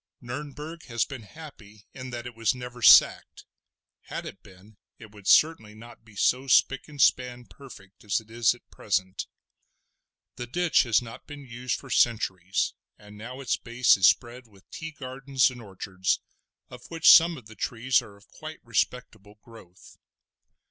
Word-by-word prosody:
Nurnberg 150 +6 -8
has 115 -2 -1
been 130 -3 -9
happy 110 -5 -14
in 130 -1 -8
that 120 -1 -7
it 125 - -8
was 115 +1 0
never 125 -1 -9
sacked; - - +5 0.6
had - - -6
it - - -10
been 100 +2 -18 0.2
it 110 -2 -14
would 105 -2 -13
certainly 115 -10 +3
not 115 +1 -14
be 110 -2 -19
so 130 +6 +1
spick 135 +1 +3
and 145 -2 -13
span 125 -2 +2
perfect 105 -10 -15
as 105 -2 0
it 110 0 -18
is 115 -1 +2
at 120 - -23
present. 95 -2 -3 1.1
The 120 - -6
ditch 175 +6 +2
has 115 - +3
not 115 -1 -12
been 145 -2 -10
used 125 0 -4
for 135 - -12
centuries, 95 -6 0 0.2
and 105 0 -15
now 125 +5 -9
its 130 - -1
base 120 -2 +3
is 95 -1 +5
spread 120 +1 0
with 100 -3 -23
tea 160 - -7
gardens 135 -2 -1
and 125 -1 -11
orchards, 95 -2 -3 0.5
of - - -12
which 165 -1 -1
some 165 0 +8
of 125 - -13
the 110 - -13
trees 120 +3 0
are 100 - -14
of 100 - -23
quite 155 0 -10
respectable 110 -3 -3
growth. 105 -6 -17
120 Hz, 170 wpm, -26 LUFS, 105-130 Hz, 1.1 s, some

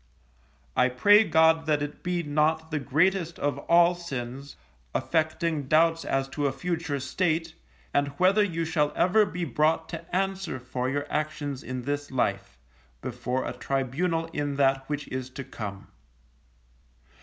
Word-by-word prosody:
I 125 0 +4
pray 205 - +6
God 160 -2 +4
that 150 -1 +2
it 145 0 -6
be 175 -1 -1
not 155 +2 +1
the 155 - 0
greatest 170 +5 +1
of 145 -1 -1
all 170 +1 +6
sins, 140 -5 -6 0.4
affecting 160 -2 0
doubts 165 +2 +3
as 135 0 0
to 145 +1 -1
a - - 0
future 160 -2 -2
state, 165 +4 -1 0.4
and 145 0 +2
whether 190 +3 +4
you 165 -4 -1
shall 150 -2 +1
ever 210 +3 +4
be 180 -1 -3
brought 155 +3 +1
to 165 +1 -6
answer 190 -6 -1
for 125 +1 -3
your 145 +1 -1
actions 150 -3 -2
in 130 -1 -5
this 145 +2 -3
life, 125 - -1 0.5
before 125 +1 -2
a - - -3
tribunal 150 +6 -1
in 145 -1 -2
that 135 -1 +2
which 145 -1 -3
is 130 -1 -4
to 130 +1 -7
come. 100 -5 -7
150 Hz, 150 wpm, -27 LUFS, 135-170 Hz, 0.5 s, pray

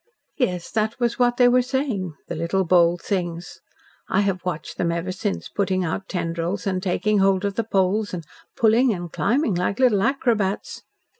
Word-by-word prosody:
Yes, 180 -9 -1
that 220 +2 -1
was 240 0 0
what 245 -1 +3
they 245 - +6
were 250 +1 +5
saying, 245 - -2
the - - -4
little 170 +4 0
bold 175 0 +3
things. 175 -3 -3 0.5
I - - +2
have 195 -3 -1
watched 170 -4 -5
them 170 - +1
ever 170 +2 -2
since, 195 +2 -3
putting 190 -2 -1
out 185 +4 -4
tendrils 170 +1 -2
and 185 -2 -1
taking 205 +2 +1
hold 195 0 +3
of 200 - -1
the 230 - -1
poles 205 0 +1
and 170 -3 -5 0.3
pulling 230 +3 +4
and 175 -2 -7
climbing 255 -3 +1
like 180 +3 -1
little 240 -7 +4
acrobats. 220 -6 0
195 Hz, 175 wpm, -23 LUFS, 175-225 Hz, 0.5 s, they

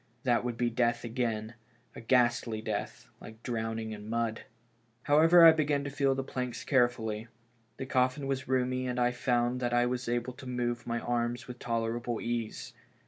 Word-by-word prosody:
That 120 -3 +2
would 120 -2 -3
be 120 0 0
death 120 0 +1
again, 115 -2 -2 0.4
a - - -8
ghastly 120 -2 +2
death, 110 - -4
like 110 +1 -12
drowning 110 -2 -3
in 105 0 -8
mud. 115 -1 -2 0.6
However, 165 +4 +7
I 165 - +11
began 150 -3 +1
to 140 - -5
feel 135 -1 +1
the 135 - -2
planks 125 -2 -4
carefully. 120 -4 +1 0.5
The 130 - -4
coffin 130 +2 +1
was 135 -1 -2
roomy, 130 0 0
and 125 0 -2
I 120 0 +3
found 125 0 0
that 120 -1 0
I 120 0 +4
was 125 0 -2
able 120 +1 -1
to 130 +1 -11
move 120 -1 -2
my 120 0 -1
anns 120 0 -2
with 125 -1 -9
tolerable 115 0 -2
ease. 115 -2 -4
120 Hz, 175 wpm, -30 LUFS, 115-130 Hz, 0.6 s, I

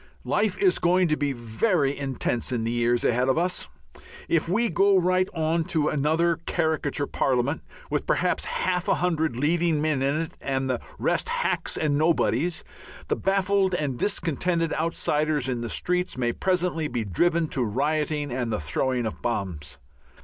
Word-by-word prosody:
Life - - +1
is 385 -2 +3
going 180 +1 +3
to 155 - +3
be 145 -1 -1
very 135 - 0
intense 130 -3 -2
in 120 -3 -1
the 115 - -1
years 120 0 +1
ahead 125 +2 +2
of 130 - +2
us. 180 - 0 0.6
If 165 0 +1
we 230 +6 +2
go 195 +2 +3
right 185 +1 +2
on 160 +1 +1
to 160 -5 +1
another 160 +4 +1
caricature 155 -4 0
Parliament, 130 +3 0 0.3
with - - -1
perhaps - - +1
half 180 -1 -1
a - - +3
hundred 160 -6 0
leading 160 +4 +1
men 150 -3 0
in 140 +4 +1
it 165 - -5
and 135 -1 -1
the 125 -2 -1 0.2
rest - - 0
hacks - - -1
and 145 -2 +1
nobodies, 160 0 +1 0.5
the - - +2
baffled 195 -1 +1
and 140 -7 -2
discontented 165 -3 0
outsiders 155 -3 0
in 125 -2 -2
the 120 - -4
streets 180 +1 -1
may 120 -2 0
presently 180 -4 0
be 120 -5 -2
driven 165 - +1
to 130 - -1
rioting 145 +5 -1
and 120 -2 -2
the 105 - -1
throwing 120 - -1
of 110 - -5
bombs. 95 -11 -3
155 Hz, 165 wpm, -25 LUFS, 130-175 Hz, 0.6 s, is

